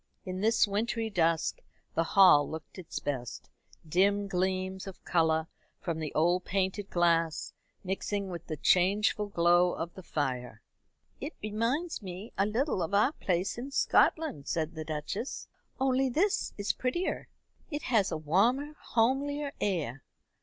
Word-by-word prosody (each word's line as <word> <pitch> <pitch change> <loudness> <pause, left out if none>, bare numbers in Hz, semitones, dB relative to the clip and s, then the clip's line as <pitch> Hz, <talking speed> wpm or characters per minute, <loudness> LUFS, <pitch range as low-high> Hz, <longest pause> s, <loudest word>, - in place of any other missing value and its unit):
In 185 0 -4
this 220 0 +4
wintry 220 +2 -1
dusk 165 -3 +1 0.3
the 165 - +2
hall 165 -5 +6
looked 160 +4 -8
its 175 - -7
best, 130 -5 -4 0.4
dim 200 +5 +2
gleams 190 +1 -1
of 190 - -10
colour 160 -2 +2 0.3
from 165 -2 -3
the 155 -2 -3
old 175 +4 +3
painted 195 +1 -1
glass 165 -2 +1 0.3
mixing 195 +1 -2
with 170 -2 -7
the 155 - -4
changeful 200 +6 +3
glow 175 -1 +3
of 165 +1 -4
the 190 - -10
fire. 125 -8 -3 0.6
"It - - -5
reminds 230 +11 -1
me 190 +3 -8
a 200 - +2
little 230 - 0
of 175 +4 -1
our 210 +7 +4
place 185 - -1
in 260 +3 -5
Scotland," 275 - +2
said 160 0 -1
the 160 -1 -5
Duchess, 155 - -4 0.3
"only 265 0 +2
this 365 +11 +1
is 205 0 0
prettier. 260 +9 -2 0.4
It 295 -2 -4
has 225 -7 +2
a - - -1
warmer 235 - +1 0.2
homelier 280 +5 +1
air. 150 - -1
190 Hz, 145 wpm, -30 LUFS, 165-225 Hz, 0.6 s, hall